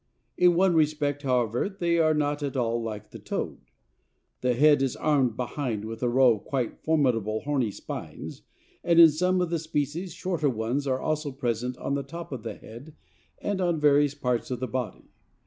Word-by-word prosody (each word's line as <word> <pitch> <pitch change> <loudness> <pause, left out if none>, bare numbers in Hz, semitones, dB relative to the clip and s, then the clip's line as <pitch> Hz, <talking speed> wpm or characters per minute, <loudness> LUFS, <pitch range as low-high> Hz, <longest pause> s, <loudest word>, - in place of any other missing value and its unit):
In 180 -1 +4
one 185 +1 +4
respect, 150 -2 +1
however, 125 - 0
they 175 -4 0
are 155 -1 +3
not 145 0 0
at 140 -2 -3
all 120 -1 0
like 110 -3 -6
the - - -9
toad. - - -4 0.8
The 125 -1 +1
head 145 +2 +5
is 135 -2 0
armed 135 -7 +1
behind 125 -4 -3
with 110 0 -7
a 125 - +1
row 125 0 +5
of - - -16
quite 130 -4 -3
formidable 120 -9 +1
horny 140 -6 0
spines, 100 - -7 0.4
and 170 -1 +4
in 165 -2 +10
some 180 +4 +1
of 175 -2 -1
the 170 - 0
species 155 +3 -3
shorter 170 -4 -1
ones 120 +4 -2
are 130 -1 0
also 155 0 -2
present 125 -1 -2
on 140 - -3
the 140 - 0
top 165 +5 -8
of 130 -4 -5
the 110 -2 -6
head 130 +8 -12 0.4
and 200 -2 -2
on 175 -3 +1
various 145 -1 +4
parts 125 -4 -1
of 125 -2 -3
the 130 - -2
body. 120 -4 -5
140 Hz, 190 wpm, -27 LUFS, 125-155 Hz, 0.8 s, in